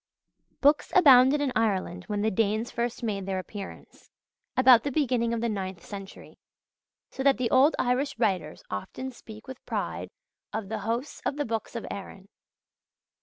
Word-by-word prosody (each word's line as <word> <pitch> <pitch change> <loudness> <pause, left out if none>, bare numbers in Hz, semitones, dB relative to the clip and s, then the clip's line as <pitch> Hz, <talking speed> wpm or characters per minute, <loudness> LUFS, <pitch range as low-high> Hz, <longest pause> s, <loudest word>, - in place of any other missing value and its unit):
Books 290 +2 +3
abounded 280 -4 +7
in 280 -3 0
Ireland 190 -5 0
when 205 -1 -2
the 220 - +2
Danes 215 +3 0
first 235 0 -3
made 200 -4 -2
their 190 -1 -1
appearance, 195 +2 -9 0.5
about 255 -2 +7
the 285 - -3
beginning 250 -5 +1
of 230 -1 -1
the 235 - 0
ninth 190 -4 -4
century; 195 -2 -10 0.7
so - - -6
that 275 0 +4
the 250 -2 -1
old 270 +4 +5
Irish 260 +4 0
writers 180 -6 -1
often 255 - -5
speak 220 -2 -13
with 260 0 -9
pride - - -3 0.4
of 215 -2 -4
"the 220 -1 -3
hosts 235 +7 -3
of 285 - -1
the 290 0 -2
books 225 0 -4
of 230 - -4
Erin." 195 0 -9
230 Hz, 165 wpm, -27 LUFS, 200-260 Hz, 0.7 s, abounded